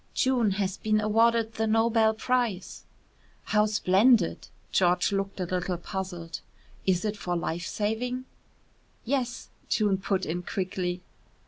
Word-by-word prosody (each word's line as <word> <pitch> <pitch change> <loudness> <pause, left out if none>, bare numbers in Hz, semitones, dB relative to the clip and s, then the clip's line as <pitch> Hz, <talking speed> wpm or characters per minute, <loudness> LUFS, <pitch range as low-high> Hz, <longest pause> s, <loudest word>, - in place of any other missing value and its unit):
"June 255 -5 +2
has 195 -1 -1
been 215 0 +1
awarded 225 +1 +2
the 220 0 -1
Nobel 225 0 +3
prize." 230 -5 -1 0.6
"How 210 0 +2
splendid!" 210 0 +3 0.2
George 180 +2 +3
looked 195 0 -2
a - - 0
little 180 0 -2
puzzled. 175 -2 -5 0.5
"Is 185 +1 +2
it 210 0 -1
for 180 -3 -3
life 170 0 -2
saving?" 245 +5 -2 0.8
"Yes," 250 -1 -2 0.2
June 205 -3 +2
put 190 -1 -1
in 170 +3 -2
quickly. 180 -1 -3
205 Hz, 125 wpm, -27 LUFS, 185-225 Hz, 0.8 s, Nobel